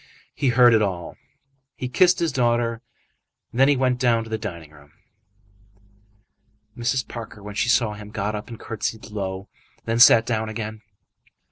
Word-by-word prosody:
He 145 - -1
heard 120 0 +6
it 110 - +4
all; 90 -5 -3 0.8
kissed 180 0 +5
his 170 -3 0
daughter, 120 -3 0 0.7
and 120 - -6
then 135 +1 +5
went 125 -1 +1
down 115 -3 +2
to 110 - -12
the 110 - -1
dining 85 -8 -7
room. 75 0 -19 1.8
Mrs. 120 0 -1
Parker, 110 -3 -9
when 105 0 -7
she 115 +3 0
saw 110 -2 +2
him, 105 0 -10
got 105 0 -3
up, 105 0 -6
and 115 -2 -9
curtsied 110 0 -5
low, 95 -2 -4 0.3
and - - -35
then 115 0 -1
sat 115 -1 +8
down 110 -2 -2
again. 110 0 -6
115 Hz, 160 wpm, -23 LUFS, 105-120 Hz, 1.8 s, sat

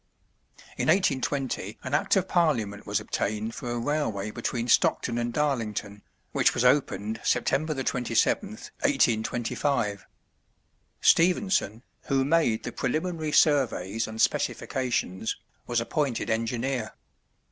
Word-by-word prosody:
In - - -1
1820 135 - 0
an 130 - -5
act 145 - +2
of 190 -1 +1
Parliament 115 - 0
was 100 0 +1
obtained 105 +1 -2
for 120 - -6
a 120 - -2
railway 115 -6 -1
between 120 +2 -3
Stockton 120 0 +2
and 120 0 -1
Darlington, 115 -7 -2 0.3
which - - +2
was 120 - +1
opened 110 -5 +1
September 155 +1 +1
27th, 135 - -1
1825. 120 - 0 0.9
Stephenson, 175 - +3 0.2
who 135 -1 +1
made 145 -7 +2
the - - -4
preliminary 155 +3 -2
surveys 115 - +2
and 110 0 -8
specifications, 115 -8 0 0.3
was 120 -1 +1
appointed 130 +1 -1
engineer. 115 +1 -2
125 Hz, 110 wpm, -27 LUFS, 110-150 Hz, 0.9 s, Stephenson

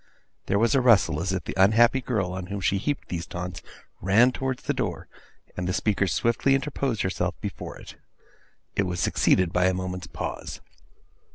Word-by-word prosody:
There 100 - +2
was 115 +2 +3
a 135 - +4
rustle, 95 -10 +4
as 95 - -1
if 95 -1 -2
the - - -5
unhappy 115 +7 +5
girl, 105 -8 -1
on 95 -1 -5
whom 100 +1 -4
she 95 +1 +1
heaped 145 +7 -3
these 85 -2 -4
taunts, 90 0 -6 0.4
ran 110 +7 +5
towards 130 0 -3
the - - 0
door, - - -3 0.5
and 90 0 -3
the 90 - 0
speaker 100 -1 +1
swiftly 120 +7 +2
interposed 135 -5 -1
herself 95 - -2
before - - -6
it. - - -12 0.8
It 95 - +1
was 90 -1 -3
succeeded 90 0 +2
by 90 +1 +3
a 95 0 +2
moment's 90 -1 -4
pause. - - -6
95 Hz, 180 wpm, -26 LUFS, 90-120 Hz, 0.8 s, unhappy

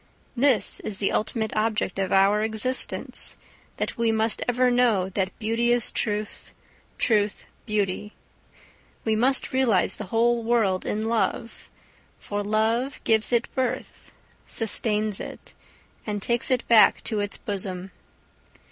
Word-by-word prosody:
This 260 -2 +2
is 205 - -4
the 195 - 0
ultimate 220 0 -1
object 215 -3 0
of 190 - -1
our 195 +2 +4
existence, 220 +4 0 0.4
that - - -3
we 230 -1 +2
must 220 0 +2
ever 250 +1 +2
know 230 -7 +2
that 190 0 -3
"beauty 230 +2 0
is 240 -2 +2
truth, 210 -1 -3 0.4
truth 210 -3 +1 0.2
beauty"; 210 -1 -1 0.9
we 220 -1 +2
must 260 +5 +2
realise 240 -8 +2
the 210 - -6
whole 235 +4 +2
world 225 -5 +1
in 215 +1 -2
love, 230 0 -2 0.5
for 205 0 -4
love 220 +6 0
gives 220 +1 +2
it 235 -1 +2
birth, 260 -2 -3 0.4
sustains 215 -2 -1
it, - - -9 0.5
and 205 -2 -3
takes 235 0 -1
it 255 -2 0
back 230 -2 +6
to 215 -3 -2
its 205 0 -3
bosom. 190 -2 -5
220 Hz, 130 wpm, -25 LUFS, 205-235 Hz, 0.9 s, back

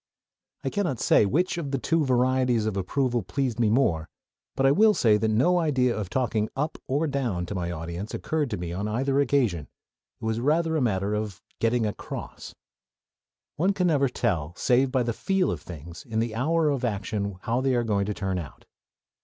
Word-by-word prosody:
I - - -2
cannot 175 - -1
say 105 - +4
which 175 - 0
of 150 -4 -4
the 135 - 0
two 160 +5 +1
varieties 125 -3 +2
of 110 -2 -1
approval 120 +6 0
pleased 130 -3 -2
me 115 -3 +3
more; 85 - +1 0.5
but 135 - +1
I 135 - +6
will 215 +7 +5
say 110 -3 +4
that 110 - 0
no 145 +12 +3
idea 130 -7 +2
of 105 -4 -4
talking 110 -4 0
"up" 150 +4 -2
or 145 +5 +1
"down" 125 - -1
to 90 - -5
my 90 -3 -2
audience 85 +4 -5
occurred 155 -4 -1
to 105 - -3
me 85 -1 -5
on 100 +4 -2
either 135 +6 +1
occasion: 120 - +1 0.5
it 115 - -7
was 110 0 0
rather 160 +5 +1
a 155 - +1
matter 100 -4 0
of 105 -3 -3 0.2
"getting 115 0 +2
across." 105 - -6 1.0
One 190 +5 +2
never 155 -6 +3
can 125 - -9
tell 85 -9 -1
save 130 +1 +2
by 130 -1 +2
the 115 0 -1
"feel" 190 - 0
of - - -4
things 85 0 -10
in 115 -4 -5
the 115 0 0
hour 155 +7 +1
of 140 -3 -1
action 100 -3 -2
how 120 +3 0
they 130 -1 +1
are 120 - +2
going 100 -3 0
to 105 - -1
turn 95 -2 -2
out. 80 -6 -10
120 Hz, 200 wpm, -26 LUFS, 105-140 Hz, 1.0 s, I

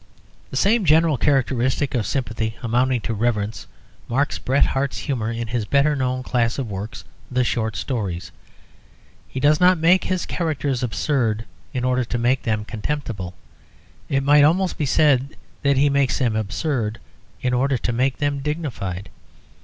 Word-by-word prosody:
The - - -4
same 215 +2 +3
general 160 -1 +4
characteristic 130 0 +1
of 120 -5 0
sympathy 115 -4 -2
amounting 125 +1 +1
to 115 - -3
reverence 105 -2 -1 0.4
marks 135 +4 0
Bret 135 +2 +2
Harte's 135 0 -1
humour 120 -6 -2
in 115 -1 -4
his 115 -1 -1
better 140 +5 +3
known 130 -1 -1
class 115 -3 0
of 135 -4 -2
works, 100 +4 -6 0.3
the 125 0 +1
short 110 -3 -1
stories. 100 -9 -3 1.0
He 130 - -5
does 150 +3 +4
not 180 0 +5
make 170 +4 +4
his 185 -1 -1
characters 140 -6 -1
absurd 115 -1 0 0.3
in 125 - -3
order 130 0 +2
to 120 +1 -3
make 125 +3 +2
them 110 -2 -1
contemptible: 110 -6 -4 0.7
it 135 -1 +1
might 145 +1 +6
almost 180 +5 +3
be 150 - -1
said 140 -1 +3 0.3
that 140 -1 +2
he 140 +2 +4
makes 140 -1 +2
them 120 -5 +1
absurd 110 +1 -1 0.5
in 125 0 +1
order 130 +2 +2
to 120 - -2
make 130 +3 +1
them 145 -1 -1
dignified. 135 - -4
130 Hz, 160 wpm, -22 LUFS, 115-145 Hz, 1.0 s, might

